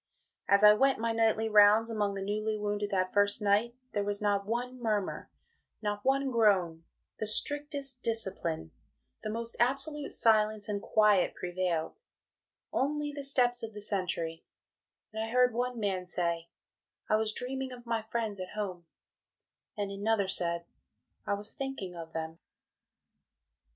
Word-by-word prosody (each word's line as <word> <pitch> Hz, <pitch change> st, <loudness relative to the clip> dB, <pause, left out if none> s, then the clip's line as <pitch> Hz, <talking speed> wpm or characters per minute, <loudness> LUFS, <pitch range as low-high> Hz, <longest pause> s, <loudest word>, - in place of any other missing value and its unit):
As 200 Hz, +1 st, +4 dB
I 210 Hz, 0 st, +10 dB
went 270 Hz, +5 st, +3 dB
my 230 Hz, 0 st, 0 dB
night 225 Hz, -1 st, +2 dB
rounds 210 Hz, +2 st, +6 dB
among 205 Hz, -2 st, 0 dB
the 195 Hz, -, -4 dB
newly 215 Hz, +2 st, -1 dB
wounded 205 Hz, 0 st, -2 dB
that 185 Hz, -2 st, 0 dB
first 205 Hz, 0 st, +3 dB
night, 210 Hz, +4 st, +2 dB, 0.2 s
there 205 Hz, -1 st, -1 dB
was 205 Hz, 0 st, -2 dB
not 205 Hz, -1 st, 0 dB
one 245 Hz, +2 st, -3 dB
murmur, 210 Hz, -4 st, -1 dB, 0.5 s
not 205 Hz, -1 st, -3 dB
one 270 Hz, 0 st, +2 dB
groan, 190 Hz, -8 st, +2 dB, 0.4 s
the 215 Hz, -, -2 dB
strictest 280 Hz, +2 st, -1 dB
discipline 190 Hz, -, -2 dB, 0.5 s
the -, -, -4 dB
most 230 Hz, +1 st, -3 dB
absolute 275 Hz, +4 st, 0 dB
silence 215 Hz, -2 st, +3 dB
and 205 Hz, -1 st, -2 dB
quiet 210 Hz, -4 st, +3 dB
prevailed 175 Hz, -2 st, -2 dB, 0.8 s
only 295 Hz, +2 st, 0 dB
the 285 Hz, -1 st, -6 dB
steps 245 Hz, -3 st, +3 dB
of 225 Hz, -1 st, -6 dB
the 210 Hz, -, -7 dB
Sentry 180 Hz, -5 st, -1 dB, 0.7 s
and 220 Hz, 0 st, -2 dB
I 225 Hz, -, -4 dB
heard 250 Hz, 0 st, +3 dB
one 245 Hz, 0 st, -2 dB
man 190 Hz, -4 st, -1 dB
say, 170 Hz, -2 st, -2 dB, 0.6 s
"I 215 Hz, -, +3 dB
was 220 Hz, 0 st, 0 dB
dreaming 260 Hz, +3 st, -3 dB
of 245 Hz, -1 st, -10 dB
my 230 Hz, -1 st, -1 dB
friends 220 Hz, -2 st, -3 dB
at 185 Hz, +2 st, -7 dB
Home," 185 Hz, -5 st, -4 dB, 0.9 s
and 200 Hz, -1 st, -2 dB
another 200 Hz, 0 st, 0 dB
said, 170 Hz, -2 st, -1 dB, 0.6 s
"I 200 Hz, -, +1 dB
was 205 Hz, +2 st, -5 dB
thinking 270 Hz, -10 st, -5 dB
of 165 Hz, -1 st, -8 dB
them." 160 Hz, 0 st, -5 dB
210 Hz, 150 wpm, -31 LUFS, 195-235 Hz, 0.9 s, I